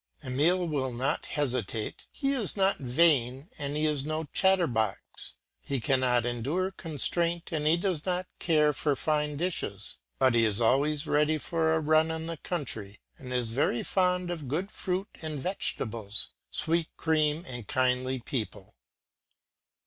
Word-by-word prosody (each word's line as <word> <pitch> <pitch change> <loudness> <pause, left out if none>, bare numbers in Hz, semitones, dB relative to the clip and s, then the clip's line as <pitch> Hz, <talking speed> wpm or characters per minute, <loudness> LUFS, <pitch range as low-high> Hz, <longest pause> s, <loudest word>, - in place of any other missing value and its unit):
Emile 165 +8 +2
will 135 -5 -1
not 125 +3 -1
hesitate; 120 -7 -2
he 275 0 -1
is 230 -6 +2
not 195 0 +3
vain 135 +1 +2
and 145 0 -2
he 155 - +1
is 150 -3 +1
no 155 +2 -2
chatterbox; 165 - +1 0.2
he 140 -2 -3
cannot 125 -1 +2
endure 140 +11 -1
constraint, 170 +1 -1
and 150 -2 0
he 160 +2 +5
does 175 -4 -1
not 180 0 -1
care 150 -3 +3
for 145 0 0
fine 150 0 0
dishes; 145 - -2 0.2
but 130 -2 +4
he 115 -1 +4
is 110 -1 +2
always 145 +6 +2
ready 150 +1 +2
for 160 +1 0
a - - +2
run 155 +1 +3
in 160 0 -3
the 165 0 -5
country 115 - -4 0.2
and 125 -1 -8
is 125 -3 +1
very 120 -1 +1
fond 180 -1 +1
of 160 -6 -5
good 175 +10 -2
fruit 190 +1 -2
and 155 -3 -4
vegetables, 115 - 0 0.2
sweet 165 0 0
cream 155 0 +1
and 120 -5 -6
kindly 130 0 +1
people. 115 -5 -5
150 Hz, 150 wpm, -29 LUFS, 125-165 Hz, 0.2 s, he